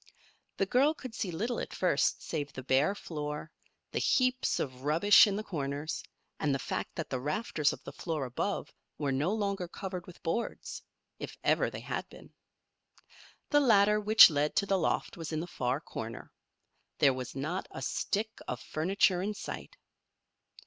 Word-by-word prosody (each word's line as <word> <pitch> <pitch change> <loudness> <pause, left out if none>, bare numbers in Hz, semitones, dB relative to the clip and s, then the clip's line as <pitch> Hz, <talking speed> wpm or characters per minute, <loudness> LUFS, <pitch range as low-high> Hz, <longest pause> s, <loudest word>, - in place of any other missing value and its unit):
The 195 - +2
girl 275 +9 +3
could 255 -6 -8
see 220 -4 -3
little 220 +9 -2
at - - -5
first - - +1
save 145 -1 -3
the 130 - -8
bare 135 +9 +3
floor, 150 -3 -5 0.4
the - - -1
heaps 255 0 +2
of 130 -2 -4
rubbish 165 - +6
in 200 - -1
the 215 - -3
corners, 145 -4 -3 0.4
and 145 -3 +1
the - - +1
fact - - -4
that - - -3
the 130 - -1
rafters 150 - 0
of - - -9
the - - -7
floor 160 -5 -3
above 125 -1 -3 0.2
were 145 -2 -1
no 145 +7 +1
longer 200 -4 -1
covered 185 -1 -6
with 180 - -13
boards 170 +8 -3 0.4
if - - -7
ever - - +3
they - - -7
had - - -4
been. - - -14 1.2
The 290 - +6
ladder 210 -5 +5
which 215 -2 +9
led 150 0 0
to 200 - +3
the 195 -1 +2
loft 165 - -1
was 165 -1 -5
in 155 - -1
the 165 - -3
far 130 -5 -1
corner. 115 -7 -7 0.7
There 135 - +5
was 130 -1 -6
not 155 +7 -3
a 135 - -7
stick 215 +10 -2
of 125 - -3
furniture 185 +5 +1
in 210 +2 -2
sight. - - -7
170 Hz, 175 wpm, -31 LUFS, 145-205 Hz, 1.2 s, which